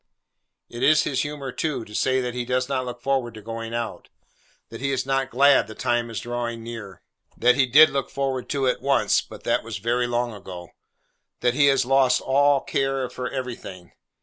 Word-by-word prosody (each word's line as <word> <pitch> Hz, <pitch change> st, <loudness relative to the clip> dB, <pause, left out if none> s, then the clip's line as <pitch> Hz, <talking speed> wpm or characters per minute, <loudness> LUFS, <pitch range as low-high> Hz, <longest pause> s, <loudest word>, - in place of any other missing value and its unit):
It 120 Hz, -, -9 dB
is 155 Hz, +3 st, +5 dB
his 130 Hz, -2 st, -1 dB
humour 145 Hz, -3 st, -5 dB
too, 150 Hz, -4 st, -3 dB
to 105 Hz, -, -14 dB
say 130 Hz, +3 st, +1 dB
that 125 Hz, -1 st, -3 dB
he 125 Hz, 0 st, -3 dB
does 125 Hz, +1 st, -1 dB
not 130 Hz, -2 st, -1 dB
look 120 Hz, 0 st, -7 dB
forward 130 Hz, -4 st, -1 dB
to 110 Hz, -, -9 dB
going 115 Hz, +1 st, -6 dB
out; 115 Hz, -1 st, -5 dB, 0.6 s
that 115 Hz, +1 st, -9 dB
he 140 Hz, -, -1 dB
is 130 Hz, -1 st, -1 dB
not 135 Hz, 0 st, 0 dB
glad 140 Hz, +1 st, +4 dB
the 110 Hz, -, -10 dB
time 120 Hz, -1 st, 0 dB
is 115 Hz, -, -4 dB
drawing 120 Hz, -1 st, -4 dB
near; 110 Hz, -6 st, -9 dB, 0.3 s
that 125 Hz, +1 st, +5 dB
he 130 Hz, -1 st, +2 dB
did 155 Hz, +5 st, +7 dB
look 135 Hz, -1 st, -2 dB
forward 135 Hz, -2 st, -3 dB
to 140 Hz, -2 st, 0 dB
it 125 Hz, -, 0 dB
once, 140 Hz, +1 st, +2 dB
but -, -, -13 dB
that -, -, +1 dB
was 115 Hz, -1 st, -6 dB
very 120 Hz, +4 st, 0 dB
long 120 Hz, -1 st, -1 dB
ago; 90 Hz, -4 st, -9 dB, 0.7 s
that 120 Hz, 0 st, +2 dB
he 140 Hz, +2 st, +4 dB
has 135 Hz, -2 st, +3 dB
lost 135 Hz, 0 st, +3 dB
all 140 Hz, +1 st, +3 dB
care 135 Hz, -2 st, -1 dB
for 125 Hz, 0 st, -4 dB
everything. 115 Hz, -9 st, -7 dB
125 Hz, 200 wpm, -24 LUFS, 120-135 Hz, 0.7 s, did